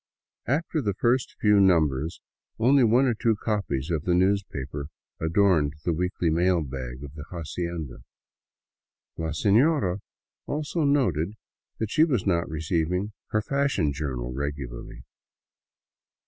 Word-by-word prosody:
After 155 +3 0
the 100 -6 -1
first 120 +4 +1
few 105 -1 +5
numbers 80 -5 +2 0.4
only 130 +4 +4
one 120 +4 +4
or 125 - +2
two 110 0 +1
copies 100 - -2
of 80 -3 0
the 90 +1 +2
newspaper 90 -7 0 0.3
adorned 80 -3 +2
the 85 - +2
weekly 90 0 0
mail 85 +1 +2
bag 65 -1 -6
of 70 -1 -9
the 75 -1 -8
hacienda. 85 -4 -5 1.2
La 80 - -2
sefiora 100 - +2 0.5
also 150 +2 -1
noted 105 - +1 0.4
that 110 -1 -3
she 155 - +5
was 130 - +1
not 85 -4 +1
receiving 85 +5 -1
her 110 0 0
fashion 140 - +1
journal 65 -4 -4
regularly. 65 -3 -5
90 Hz, 125 wpm, -26 LUFS, 75-110 Hz, 1.2 s, few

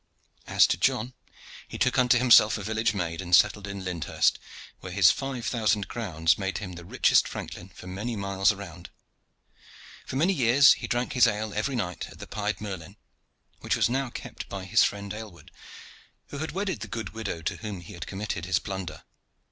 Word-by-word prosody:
As - - +5
to - - 0
John, 120 +4 0 0.5
he - - -7
took - - +2
unto 125 0 +5
himself 115 -3 +6
a 105 - -6
village 110 +1 0
maid, 85 -2 -3
and 90 -1 +4
settled 105 +2 +3
in 100 -1 -6
Lyndhurst, 90 -3 0 0.4
where - - -8
his - - +6
five 135 -3 -4
thousand 110 -3 +1
crowns 85 -8 0
made 95 0 -2
him 90 -3 -6
the 85 0 -9
richest 85 - +3
franklin 90 - -7
for 90 - -14
many 100 +6 -4
miles 100 -1 +2
around. 95 -4 -9 1.2
For - - -5
many 170 +8 +3
years 135 -1 +6
he - - -6
drank 120 +1 -1
his 125 -2 +6
ale 105 -1 -2
every 120 +6 -1
night 90 -7 -3
at - - -14
the - - -8
"Pied 105 +1 -3
Merlin," 100 -2 -7 0.6
which - - 0
was - - +2
now 135 +1 -1
kept - - -8
by 95 -1 -6
his 95 - +4
friend 100 -1 -2
Aylward, 105 -8 -10 0.8
who 140 - -6
had 160 - -3
wedded 190 - -2
the 110 - -6
good 110 +2 -5
widow 100 -7 -5
to - - -2
whom 105 -5 -6
he 85 - -11
had 85 - -7
committed 95 -3 -4
his 90 -2 +2
plunder. 95 -5 -6
105 Hz, 190 wpm, -27 LUFS, 95-115 Hz, 1.2 s, himself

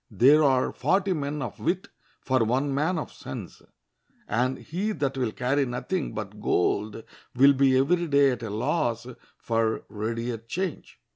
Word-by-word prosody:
There 135 +9 +5
are 130 -3 +3
forty 190 +8 +1
men 145 -2 -3
of 120 - -7
wit 180 +3 -1 0.3
for 130 -3 +2
one 130 +5 0
man 155 +6 0
of 155 - -4
sense, - - -8 0.7
and 125 +4 0
he 195 +7 -3
that 140 -5 -2
will 125 -4 -1
carry 130 +5 0
nothing 125 +8 -3
but 105 0 -6
gold 105 +4 0 0.3
will 140 +3 +7
be 135 -1 +4
every 170 +6 +2
day 140 -2 +4
at 125 -2 -4
a 115 - -4
loss 120 +1 -1 0.3
for 115 -1 0
readier 115 +2 -3
change. 170 - -5
130 Hz, 155 wpm, -26 LUFS, 115-150 Hz, 0.7 s, will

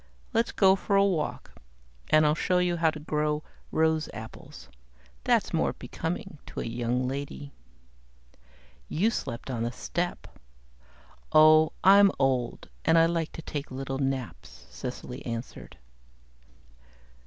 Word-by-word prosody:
"Let's 230 - +1
go 190 -1 +5
for 200 +1 -1
a 195 0 +5
walk 175 -6 -2 0.6
and 155 0 +5
I'll 150 - +4
show 180 +3 +1
you 180 -1 +1
how 165 -1 +3
to 155 - -6
grow 150 0 -1 0.3
rose 160 -1 +1
apples. 110 0 -10 0.6
That's - - +2
more - - +1
becoming 180 +1 -5
to - - -7
a - - -3
young 120 +2 -1
lady." 140 +1 -5 1.4
"You 205 +8 +1
slept 120 - -5
on 120 -3 -3
the 120 +1 -1
step." 175 +7 -3 1.1
"Ah! 155 0 +7 0.2
I'm 200 +1 +7
old 130 -3 0 0.2
and 165 0 +4
I 165 - +6
like 165 -1 -1
to 165 - -8
take 145 -2 -5
little 135 0 -4
naps," 135 - -4
Cecily - - -7
answered. 115 +1 -7
155 Hz, 130 wpm, -28 LUFS, 135-170 Hz, 1.4 s, Ah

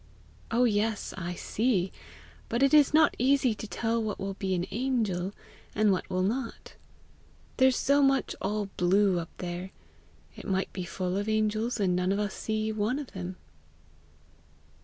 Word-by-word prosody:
"Oh, 235 +2 +2
yes, 215 -2 0
I 180 -1 -4
see! 200 -2 0 0.6
but 235 +3 +1
it 275 - +4
is 295 -2 +6
not 315 +1 +5
easy 260 -1 +3
to 215 +1 -7
tell 230 +2 -1
what 215 -2 -3
will 195 0 -4
be 190 -1 -2
an 175 0 -1
angel 215 -6 -1 0.4
and 215 -1 +4
what 185 - -1
will 185 0 0
not. 230 +5 -3 0.8
There's 260 -1 +4
so 285 +1 +3
much 270 -1 +2
all 205 0 -2
blue 185 +1 +3
up 165 - -6
there, 180 +1 -5 0.7
it - - -9
might 190 -1 -1
be 185 -2 -4
full 185 +1 -2
of 205 +2 -2
angels 215 +2 0
and 185 -3 +2
none 180 +1 +1
of 200 - +1
us 205 -1 -1
see 215 0 -2
one 215 +4 0
of 290 -3 -6
them!" 185 -1 -6
210 Hz, 165 wpm, -28 LUFS, 190-235 Hz, 0.8 s, is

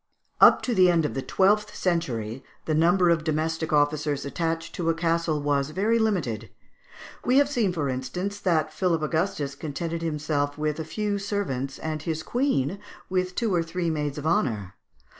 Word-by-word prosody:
Up - - +7
to 250 - 0
the 185 -4 +5
end 165 -3 +3
of - - -2
the 135 - -2
twelfth 210 +7 +2
century, 130 - -2 0.2
the 155 - 0
number 175 +3 +4
of 165 -2 +1
domestic 160 +1 -1
officers 145 -1 +1
attached 165 +2 -2
to 165 -2 -1
a 165 - +2
castle 165 -2 0
was 145 -1 0
very 210 +8 +1
limited; 140 - -1 0.7
we 255 +2 +3
have 285 0 +5
seen, 240 -9 +1
for 155 -5 -2
instance, 180 +10 -3
that 155 -5 +1
Philip 170 -4 0
Augustus 155 -3 -1
contented 165 +3 -4
himself 150 -3 -1
with 150 0 -1
a 160 - -3
few 205 +4 -2
servants, 190 -10 -3
and 155 -1 -4
his 160 0 -3
queen 200 - 0 0.3
with 185 -1 0
two 225 -5 0
or 175 - +3
three 165 0 -2
maids 150 -2 -2
of 150 - -5
honour. 110 - 0
160 Hz, 175 wpm, -26 LUFS, 145-185 Hz, 0.7 s, Up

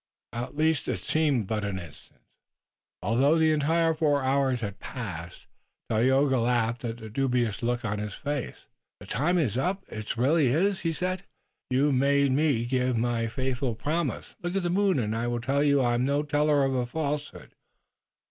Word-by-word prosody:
At 120 +4 -5
least 160 0 +1
it - - -2
seemed 145 -8 +1
but 105 +1 -2
an 100 -2 -2
instant, 85 -6 -12 0.8
although 130 - +3
the 160 -1 +4
entire 160 +2 +2
four 150 -3 +1
hours 130 -2 +1
had 100 -2 -5
passed. 90 -9 -7 0.5
Tayoga 130 +4 +3
laughed 120 0 0
at 115 -1 -3
the 110 -2 -9
dubious 120 -2 0
look 120 0 -1
on 105 -1 -2
his 105 -1 -5
face. 145 -2 -4 0.3
"The - - -11
time 165 +9 +1
is 125 - +1
up. 190 +7 -1
It 110 +1 -5
really 140 +4 +3
is," 185 +10 +2
he 165 - -1
said. 180 +3 -2 0.5
"You 135 +3 +2
made 140 +1 +3
me 135 -4 +2
give 125 -1 0
my 115 0 0
faithful 130 0 -2
promise. 150 +5 -3
Look 175 +1 -3
at 195 - 0
the 175 - 0
moon, 195 -2 +2
and 110 -4 -1
it 115 +1 -1
will 120 0 -1
tell 135 +4 +1
you 140 -2 +4
I 120 -1 +2
am 120 +1 +1
no 140 +2 +1
teller 150 0 +2
of 135 - 0
a 125 -2 0
falsehood." 150 +1 -4
130 Hz, 180 wpm, -27 LUFS, 120-150 Hz, 0.8 s, the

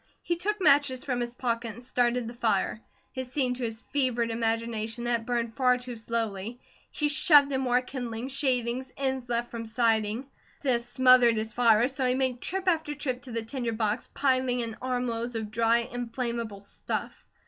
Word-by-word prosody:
He 345 - 0
took 415 +5 -1
matches 285 -6 +4
from 250 -3 -1
his 240 0 -3
pocket 230 -2 -2
and 240 +3 -12
started 245 -1 0
the 235 - -6
fire. 220 -2 0 0.3
It 260 -1 -4
seemed 255 -3 0
to 255 - -5
his 225 -1 -3
fevered 245 -5 +1
imagination 225 0 -1
that 240 -1 +1
it 225 - -12
burned 235 -2 -1
far 250 -1 +3
too 250 -1 -6
slowly. 225 -1 -3 0.3
He 300 - -1
shoved 295 -1 +6
in 265 -1 0
more 250 -1 +2
kindling, 245 -2 -5
shavings, 260 -2 0
ends 265 -2 -2
left 240 0 -1
from 230 -1 -5
siding. 225 +1 +1 0.4
This 240 -3 0
smothered 255 -2 +5
his 220 0 -3
fire, 235 -1 +4
so 265 -1 -1
he 250 - +2
made 260 -2 0
trip 380 0 -3
after 320 -4 +1
trip 255 -4 -3
to 260 - -10
the 230 -1 -2
tinder 235 0 -3
box, 215 +1 -1
piling 255 -2 +2
in 230 -2 -4
armloads 245 -2 -2
of 220 -2 -4
dry, 230 +1 +3
inflammable 235 -3 -4
stuff. 200 - -5
245 Hz, 180 wpm, -28 LUFS, 230-260 Hz, 0.4 s, shoved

